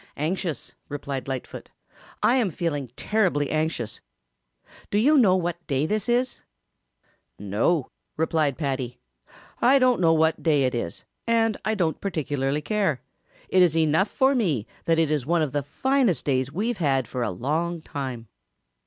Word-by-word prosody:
"Anxious," 160 - -3 0.2
replied 140 -2 -5
Lightfoot. 130 -2 -6 0.5
"I - - +5
am 230 -6 +2
feeling 145 -6 -3
terribly 185 -10 0
anxious. 155 -8 -2 0.9
Do 205 - 0
you 280 +9 +4
know 210 -10 +5
what 175 -1 -3
day 140 0 +1
this 215 +5 -1
is?" 245 +1 0 1.0
"No," 110 - 0 0.3
replied 155 -3 +1
Paddy, 130 -5 -3 0.6
"I 265 +3 +6
don't 255 -5 +3
know 165 -2 +5
what 160 0 +2
day 150 -4 +3
it 130 0 +1
is, 100 -9 -4 0.2
and 225 -2 +2
I 220 - 0
don't 170 -6 -1
particularly 145 -6 -1
care. 190 - 0 0.4
It 185 - +3
is 165 -3 +4
enough 160 +5 +3
for 270 0 +3
me 165 - 0 0.2
that 165 -1 +2
it 160 -2 +2
is 145 -4 -1
one 170 -1 +2
of 145 - -2
the 145 +1 0
finest 260 - 0
days 130 -1 0
we've 215 +9 -2
had 135 -6 +1
for 125 - -4
a 115 - 0
long 155 - -2
time." 130 -7 -5
160 Hz, 155 wpm, -25 LUFS, 135-195 Hz, 1.0 s, I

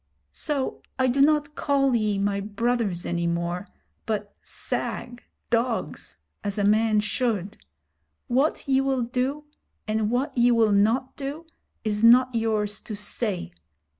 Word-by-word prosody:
So 285 -3 -2 0.2
I 260 - +2
do 260 +2 +2
not 300 0 +3
call 275 -3 +2
ye 215 -3 +1
my 200 0 0
brothers 210 -2 -1
any 170 0 -1
more, 170 +3 -2 0.4
but 210 -2 -3
sag 240 +1 -4 0.3
[dogs], 230 - -1 0.3
as 205 0 -2
a 205 - +1
man 215 +1 +3
should. 210 -2 -1 0.7
What 270 +5 +1
ye 270 0 +3
will 270 -2 0
do, 255 +5 -2 0.4
and 215 0 0
what 250 +6 -1
ye 240 0 +4
will 230 -3 +4
not 225 +6 +2
do, 285 +4 -5 0.4
is 210 0 -1
not 250 +2 +7
yours 215 -3 0
to 215 - -6
say. 200 - -3
230 Hz, 135 wpm, -25 LUFS, 205-260 Hz, 0.7 s, not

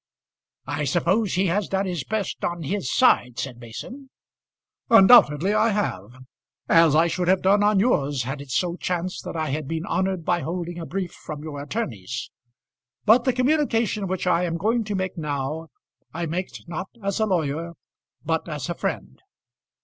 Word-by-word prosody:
"I 150 - -2
suppose 180 - +1
he 185 +2 +2
has 195 +3 0
done 195 0 0
his 175 -7 -3
best 215 +1 -3
on 170 -1 -2
his 150 -2 -2
side," 120 -1 +3
said 125 -1 -5
Mason. 250 - -9 0.8
"Undoubtedly 195 - +7
I 215 +2 +3
have, 130 - -3 0.4
as 165 -3 +5
I 160 +2 +5
should 175 +1 -1
have 185 0 +3
done 200 +2 +4
on 205 -1 +4
yours, 145 - +1
had 135 +3 -5
it 140 - -11
so 170 +6 0
chanced 180 0 -3
that - - -6
I 155 -3 -2
had 150 0 -3
been 160 +2 -3
honoured 185 -2 -1
by 175 -1 +2
holding 175 +1 -4
a 165 - -6
brief 185 -1 -3
from 150 -1 -8
your 145 -3 -6
attorneys. 130 - -4 0.7
But 230 +3 +5
the 260 - +4
communication 250 -6 +1
which 185 0 -2
I 180 -1 +2
am 165 -1 -2
going 225 +6 +1
to 205 -1 -3
make 185 -2 -3
now 150 +1 -3 0.4
I 170 +2 -3
make 175 +4 -3 0.2
not 175 +2 -5 0.2
as 200 +1 -1
a 220 - +2
lawyer 165 -2 -1 0.5
but 160 +1 -1
as 150 -2 -4
a - - 0
friend. - - -4
175 Hz, 175 wpm, -24 LUFS, 150-200 Hz, 0.8 s, Undoubtedly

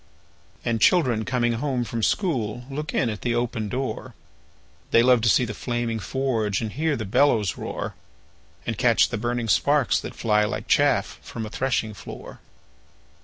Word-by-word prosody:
And 115 -2 0
children 125 -11 +3
coming 120 -2 +1
home 125 +1 -1
from 115 -1 -4
school 120 - 0
Look 150 +2 -4
in 125 - +1
at 105 - -7
the 120 -1 0
open 120 -3 -2
door; 130 +3 -4 0.7
They 115 - +5
love 125 -1 +5
to 115 - +3
see 125 - +4
the 105 - -5
flaming 120 0 -2
forge, 115 -4 -1
And 110 -2 -3
hear 155 +3 0
the 110 - -4
bellows 110 -3 +2
roar, - - -5 0.7
And - - -3
catch - - +4
the 115 - -3
burning 120 0 -1
sparks 140 +4 +3
that - - -7
fly, 105 -2 +2
Like 105 - -3
chaff - - +2
from 115 - -6
a 105 - -8
threshing 120 -3 -1
floor. - - -10
120 Hz, 170 wpm, -24 LUFS, 110-130 Hz, 0.7 s, They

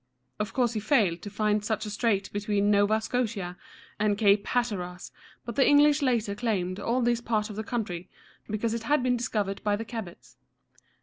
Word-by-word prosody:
Of 210 0 -2
course 245 -3 +1
he 220 - -1
failed 205 -7 +2
to 205 - -7
find 210 0 0
such 220 +1 -2
a 210 - -5
strait 205 -2 0
between 205 0 +1
Nova 205 +1 +3
Scotia 220 -6 -2 0.4
and 205 -1 +2
Cape 200 -1 +3
Hat´ter 205 -8 -1
as, 180 - -11 0.3
but 235 - -5
the 275 - +4
English 290 +1 +5
later 235 -6 +1
claimed 200 -4 -1
all 240 +4 0
this 240 0 +1
part 215 -2 -1
of - - -8
the 220 - -3
country, 200 -7 -4 0.4
because 215 +2 -1
it 230 - -2
had 290 +3 +1
been 250 -1 +2
discovered 210 -5 -2
by 205 -1 +2
the 225 +2 -5
Cabots. 220 -7 -8
215 Hz, 190 wpm, -27 LUFS, 200-235 Hz, 0.4 s, English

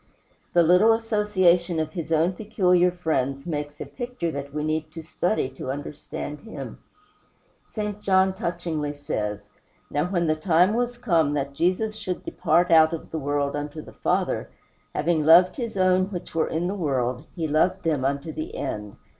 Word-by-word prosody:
The 175 - +5
little 180 +7 +6
association 190 -6 +2
of 155 -1 -2
his 165 -2 -5
own 165 +3 +3
peculiar 180 -4 +2
friends 140 -6 -2
makes 150 -3 -4
a - - -4
picture 245 -9 -4
that 140 -1 -6
we 150 +1 -3
need 155 0 -2
to 165 - -7
study 175 0 0
to 130 0 -7
understand 145 +1 -6
him. 225 - -8 0.9
St. 210 -1 -4
John 190 -1 +3
touchingly 165 -5 -3
says: 105 -8 -4 0.4
"Now 145 +2 +1
when 175 -2 0
the 155 -1 +2
time 175 +4 +3
was 245 +1 -1
come 165 -11 +2
that 140 -1 -2
Jesus 185 +8 0
should 180 -3 -5
depart 175 +3 +2
out 160 0 +6
of 165 - -6
the 160 - -2
world 145 0 -1
unto 145 +1 -5
the - - -13
Father, - - -1 0.5
having 160 0 +1
loved 170 +4 +6
his 230 -5 -4
own 185 0 +3
which 180 -4 -7
were 165 -1 +1
in 165 +2 -1
the 190 - -1
world 135 -6 -1
he 165 -3 -2
loved 180 +5 +1
them 155 -6 0
unto 140 +3 -1
the 155 +1 -6
end." 105 -1 -4
165 Hz, 170 wpm, -25 LUFS, 145-185 Hz, 0.9 s, little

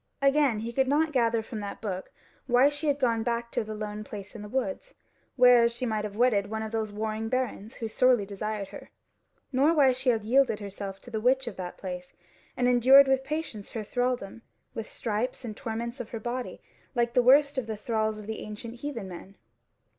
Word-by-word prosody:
Again, 275 -3 +3
he 235 +1 -5
could 265 +1 +2
not 305 +3 +2
gather 230 -4 +2
from 220 0 -6
that 200 -1 -6
book 190 -4 -5 0.4
why 250 +3 +5
she 295 +2 -4
had 285 -1 +2
gone 235 -5 +1
back 235 0 -2
to - - 0
the 215 0 -6
lone 210 0 -5
place 205 -1 -8
in 220 - -7
the 210 - -8
woods, 280 - -3 0.4
whereas 245 -2 +6
she 255 - -3
might 215 -2 -1
have 205 -1 -6
wedded 215 -4 +2
one 220 0 -3
of 220 - -5
those 220 -2 -2
warring 220 +1 -3
barons 255 -2 -2
who 225 - -4
sorely 245 -1 +3
desired 205 0 -4
her: - - -11 0.6
nor 285 +5 +3
why 275 -4 +6
she 255 +1 0
had 225 -3 +1
yielded 255 -2 +3
herself 200 -1 -6
to 245 - -11
the 220 -2 -2
witch 260 +3 +3
of 235 -5 -6
that 180 -1 -6
place 180 -1 -7 0.4
and 245 - +2
endured 260 +3 +7
with 265 0 +2
patience 285 -8 -5
her 225 - -3
thralldom, 245 -2 -2 0.3
with 225 - -5
stripes 235 +3 -3
and 215 -2 -5
torments 235 +1 -4
of 235 -2 -6
her 230 - -5
body, 245 +2 -5 0.3
like 235 -1 +1
the 250 - +5
worst 280 +2 +5
of 240 - -6
the 220 -1 -4
thralls 220 -1 -1
of 210 - -9
the 220 +1 -5
ancient 225 +3 -8
heathen 255 -9 -4
men. 185 +2 -10
235 Hz, 210 wpm, -28 LUFS, 215-255 Hz, 0.6 s, endured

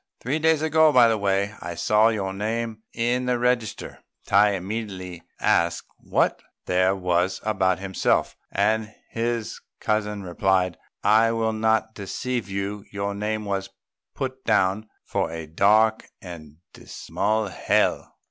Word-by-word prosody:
Three 135 +6 -1
days 160 -1 +2
ago, 160 0 +4
by 125 -4 +6
the 110 - +1
way, 100 +1 0
I 85 +1 -5
saw 105 +6 +3
your 100 -4 -2
name 110 +2 -3
in 120 +2 0
the 125 -1 +2
register." 120 -2 -1 0.3
Tai 100 +1 +4
immediately 95 -3 -5 0.2
asked 85 0 +1
what - - 0 0.2
there 95 +1 +2
was 90 0 0
about 95 -4 +1
himself, 95 0 0 0.2
and 110 +2 0 0.2
his 115 -1 -2 0.2
cousin 105 -2 -1
replied, 90 -1 0 0.2
"I 110 +2 +5
will 110 -1 0
not 110 0 +1
deceive 120 +3 -4
you; 100 +1 -3
your 100 0 -3
name 105 +1 -3
was 95 -1 -2 0.5
put 130 0 -4
down 105 0 +1 0.2
for - - -1
a 80 0 -6
dark 105 +7 +3
and 80 -5 -10 0.2
dismal 110 0 -2
hell." - - 0
105 Hz, 135 wpm, -24 LUFS, 95-115 Hz, 0.5 s, by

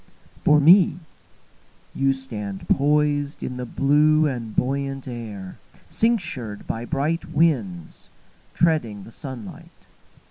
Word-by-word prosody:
For 150 0 +5
me, 170 +2 +6 1.0
You 135 0 +2
stand 105 -7 -6
poisedIn 145 -2 +1
the 125 0 -5
blue 150 +4 +3
and 120 -6 -3
buoyant 135 +1 -2
air, 105 -6 -7 0.3
Cinctured 160 - -1
by 115 +1 -4
bright 155 +4 -1
winds, 115 - 0 0.5
Treading 120 - +1
the 115 - -13
sunlight. 125 -6 -10
135 Hz, 100 wpm, -23 LUFS, 115-150 Hz, 1.0 s, me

